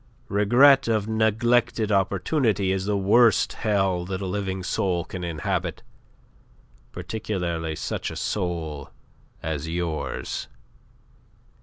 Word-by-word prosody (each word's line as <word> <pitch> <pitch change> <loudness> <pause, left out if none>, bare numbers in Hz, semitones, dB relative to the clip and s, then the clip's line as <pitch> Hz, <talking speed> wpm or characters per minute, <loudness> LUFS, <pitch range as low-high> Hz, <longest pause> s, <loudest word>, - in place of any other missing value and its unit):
Regret 125 +7 +5
of 110 -2 +1
neglected 110 0 +1
opportunity 100 - +1
is 95 0 -1
the 105 0 0
worst 110 +4 +4
hell 95 -5 0
that 95 0 -4
a 100 - -4
living 95 -1 -3
soul 90 -2 -1
can 90 -1 -7
inhabit, 85 -2 -3 1.1
particularly 90 -7 -3
such - - -3
a - - -7
soul 80 -7 -3 0.5
as 80 0 -3
yours. 85 -2 -3
95 Hz, 105 wpm, -25 LUFS, 90-110 Hz, 1.1 s, Regret